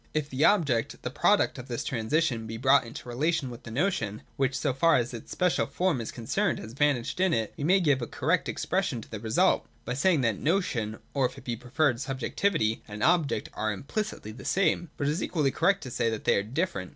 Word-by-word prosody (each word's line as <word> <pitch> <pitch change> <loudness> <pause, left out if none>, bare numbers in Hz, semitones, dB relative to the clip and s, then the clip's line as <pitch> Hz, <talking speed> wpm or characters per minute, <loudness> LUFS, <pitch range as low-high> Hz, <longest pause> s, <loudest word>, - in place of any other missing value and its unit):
If 150 -1 -1
the 130 +3 0
Object, 145 - +2
the - - -3
product - - +2
of - - -8
this - - -3
transition, 115 -1 0
be 110 0 -5
brought 135 +2 +4
into 115 - -9
relation 135 +2 0
with 120 +1 -9
the 120 - -10
notion, 115 - -1
which, 135 0 0
so 145 -3 0
far 165 +5 +4
as 120 0 -1
its 115 - -8
special 180 -1 +1
form 180 -9 0
is 115 - -5
concerned, 160 - -1
has 110 +2 -8
vanished 140 +1 0
in 185 -2 +3
it, 110 -2 -2
we - - -5
may 185 +6 +4
give 145 -7 +2
a 120 - -3
correct - - 0
expression 120 - -1
to - - -14
the 110 - -5
result, 110 0 +2 0.2
by 125 - -2
saying 155 +3 +3
that 115 -5 0
notion 130 - 0 0.2
(or, 135 -3 +2
if - - -14
it - - -11
be 120 -2 -2
preferred, 125 +2 0
subjectivity) 135 - 0
and 105 0 -5
object 160 -9 +2
are 110 0 -1
im 105 - -6
plicitly 140 - -4
the 130 - -10
same. 180 -3 +1
But 145 - -1
it 145 - +2
is 160 - -2
equally 150 -6 +1
correct 200 +7 +2
to 125 - -7
say 115 - +1
that 110 -1 -4
they - - +4
are - - +2
different. 105 - -2
130 Hz, 230 wpm, -28 LUFS, 115-160 Hz, 0.2 s, brought